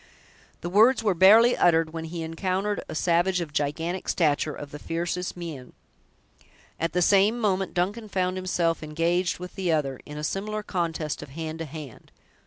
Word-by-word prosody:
The 175 Hz, -, -4 dB
words 225 Hz, +5 st, +5 dB
were 205 Hz, -3 st, +3 dB
barely 215 Hz, +7 st, +7 dB
uttered, 165 Hz, -2 st, +3 dB
when 165 Hz, -1 st, -4 dB
he 165 Hz, 0 st, -5 dB
encountered 185 Hz, +5 st, -2 dB
a -, -, -5 dB
savage 175 Hz, +3 st, +2 dB
of 160 Hz, -4 st, -5 dB
gigantic 160 Hz, +5 st, -2 dB
stature, 155 Hz, -2 st, +1 dB
of 145 Hz, -1 st, -9 dB
the 150 Hz, -, -8 dB
fiercest 175 Hz, +3 st, -3 dB
mien. 155 Hz, -8 st, -7 dB, 1.1 s
At 165 Hz, 0 st, -1 dB
the 180 Hz, 0 st, +2 dB
same 200 Hz, +5 st, +4 dB
moment, 195 Hz, -4 st, 0 dB
Duncan 205 Hz, +5 st, -1 dB
found 185 Hz, -1 st, 0 dB
himself 175 Hz, -3 st, 0 dB
engaged 165 Hz, +3 st, 0 dB
with 180 Hz, +1 st, -8 dB
the 185 Hz, -3 st, -1 dB
other, 140 Hz, -5 st, 0 dB
in 150 Hz, -, -8 dB
a 150 Hz, -, -5 dB
similar 210 Hz, +6 st, -3 dB
contest 165 Hz, -6 st, -2 dB
of -, -, -9 dB
hand 160 Hz, +2 st, -6 dB
to 165 Hz, -, -3 dB
hand. 150 Hz, -5 st, -10 dB
170 Hz, 175 wpm, -26 LUFS, 160-190 Hz, 1.1 s, barely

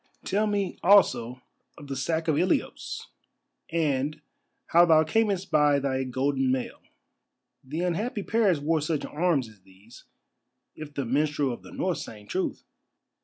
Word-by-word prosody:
Tell 210 Hz, +2 st, +1 dB
me 200 Hz, -2 st, -2 dB
also 130 Hz, -, +4 dB, 0.3 s
of 145 Hz, -, -11 dB
the 140 Hz, -1 st, -5 dB
sack 160 Hz, +5 st, -1 dB
of 155 Hz, -, +2 dB
Ilios, 180 Hz, +4 st, -1 dB, 0.6 s
and 150 Hz, -2 st, 0 dB, 0.5 s
how 170 Hz, +1 st, +6 dB
thou 160 Hz, -2 st, +5 dB
camest 195 Hz, +1 st, 0 dB
by 150 Hz, -2 st, +4 dB
thy 135 Hz, -1 st, -1 dB
golden 130 Hz, +1 st, 0 dB
mail. 130 Hz, -1 st, -3 dB, 0.8 s
The 150 Hz, +6 st, -4 dB
unhappy 200 Hz, +5 st, -2 dB
Paris 210 Hz, -6 st, +2 dB
wore 155 Hz, +2 st, 0 dB
such 155 Hz, 0 st, -2 dB
arms 155 Hz, -5 st, 0 dB
as 105 Hz, -3 st, -18 dB
these, 95 Hz, +5 st, -18 dB, 0.7 s
if 155 Hz, -1 st, -8 dB
the 140 Hz, -, -2 dB
minstrel 145 Hz, +1 st, 0 dB
of -, -, -9 dB
the -, -, -13 dB
North 185 Hz, -2 st, -2 dB
sang 105 Hz, -2 st, -9 dB
truth." 185 Hz, -, -3 dB
150 Hz, 145 wpm, -27 LUFS, 130-175 Hz, 0.8 s, how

